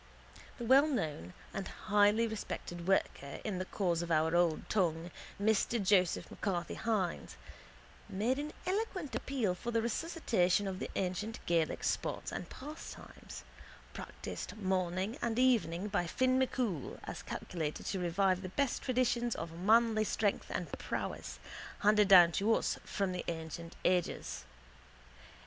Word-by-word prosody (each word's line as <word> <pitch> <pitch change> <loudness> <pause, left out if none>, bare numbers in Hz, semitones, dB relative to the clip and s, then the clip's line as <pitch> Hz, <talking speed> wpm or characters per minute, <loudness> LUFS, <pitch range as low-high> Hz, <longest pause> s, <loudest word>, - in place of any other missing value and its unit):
The - - -6
wellknown 230 - +3 0.2
and 195 - -3
highly 210 +2 +3
respected 180 -5 -5
worker 140 -7 0
in 195 -4 -2
the 185 - -2
cause 175 -4 0
of 170 - -4
our 160 +1 +2
old 175 -2 +2
tongue, 175 -4 0 0.3
Mr 220 +3 +2
Joseph 185 -3 +2
M'Carthy 175 -4 -2
Hynes, 205 -7 -1 0.7
made 235 +8 0
an 300 +1 -4
eloquent 370 -6 -2
appeal 245 -9 0
for 180 +6 -6
the 230 -1 +2
resuscitation 225 - +1
of 190 -1 -4
the - - -4
ancient 195 +4 -2
Gaelic 165 -2 +1
sports - - -1
and - - -5
pastimes, 300 +4 -9 0.5
practised - - -7
morning 190 +1 -1
and 235 -1 -1
evening 215 -8 +2
by 200 -4 0
Finn 255 +8 +2
MacCool, 240 - -1
as - - -6
calculated 160 -4 -4
to 195 - -2
revive 185 +1 +2
the 185 - -5
best 275 +5 0
traditions 240 -2 +1
of 165 0 -5
manly 215 +5 +4
strength 210 -1 0
and - - -3
prowess - - -4 0.4
handed 210 0 +5
down 180 -3 +9
to 200 +6 +1
us - - -1
from 195 -2 -2
ancient 165 0 -5
ages. 180 - 0
195 Hz, 135 wpm, -33 LUFS, 175-230 Hz, 0.7 s, down